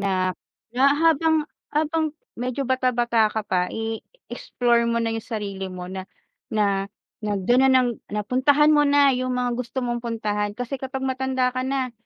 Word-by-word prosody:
na, 185 -2 0 0.4
na 250 +2 0
habang, 320 0 +3 0.3
habang 310 0 0 0.2
medyo 255 +3 -2
bata-bata 240 -3 +2
ka 220 +1 -3
pa 180 -3 0
i-explore 235 - -1
mo 235 0 +1
na 225 - 0
yung 225 -1 -4
sarili 200 -4 -4
mo 180 -1 -7
na 190 0 -6 0.4
na 200 -2 +1 0.3
na 210 -1 -2
do'n 240 +7 +3
na - - +4
ng 255 -2 +4 0.2
napuntahan 260 +8 +3
mo 295 -1 +4
na 285 0 +5
yung 255 0 -1
mga 245 -1 0
gusto 250 +1 -4
mong 240 0 -2
puntahan. 210 -3 -2
Kasi 250 +2 -4
kapag 265 0 -4
matanda 260 -1 0
ka 255 - -2
na 260 -1 -2
245 Hz, 165 wpm, -23 LUFS, 215-265 Hz, 0.4 s, na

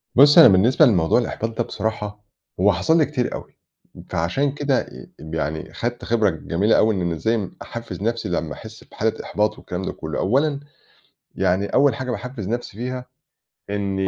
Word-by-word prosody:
بُصي 145 +5 +8
أنا - - +10
بالنسبة 115 - +5
لموضوع 90 - +3
الإحباط 115 -1 -3
ده - - +1
بصراحة 105 -1 -4 0.4
هو 100 +1 +4
حصل 130 - +2
لي 155 - +4
كتير 130 -4 -2
أوي، - - -9 0.5
فعشان 110 - 0
كده 140 -2 0
آآ - - -11
يعني 80 0 -4
خدت 120 +1 -4
خبرة 110 -3 +2
جميلة 90 +5 +1
أوي 110 -1 +3
إن 90 -2 -1
إزاي 110 +3 -1
أحفز 115 -3 -7
نفسي 115 0 -1
لمّا 80 -3 -2
أحس 110 0 -11
بحالة 110 0 -2
إحباط 105 +1 -1
والكلام 90 +1 -6
ده 95 - -3
كلّه، 80 -1 -5
أولًا. 140 +7 +1 0.8
يعني 95 +3 +1
أول 140 0 +3
حاجة 130 0 -4
باحفز 115 -2 -5
نفسي 120 -3 -4
بيها 125 +1 -4 0.6
إني 100 -1 -1
110 Hz, 165 wpm, -22 LUFS, 95-125 Hz, 0.8 s, أنا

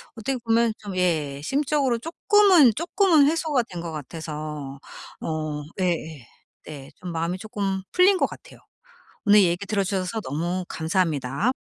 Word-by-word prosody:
어떻게 250 +4 -2
보면 230 -1 +2
좀 200 -3 -7
예. 155 -6 0
심적으로 275 - +1
쪼끔은, 340 - +4
쪼끔은 335 - +3
해소가 310 -5 +1
된 180 - -8
것 170 -1 -5
같아서. 150 -2 -6 0.4
어. 155 -2 -3 0.2
예예. 160 -7 -2 0.4
네. 140 -3 -9
좀 180 -1 -7
마음이 170 +2 -2
쪼끔 195 -2 -3
풀린 370 +2 +5
것 - - +2
같아요. - - -11 0.6
오늘 205 -1 +6
얘기 175 +2 0
들어주셔서 195 0 -1
너무 175 +6 -3
감사합니다. 160 - 0
185 Hz, 295 characters per minute, -24 LUFS, 160-245 Hz, 0.6 s, 오늘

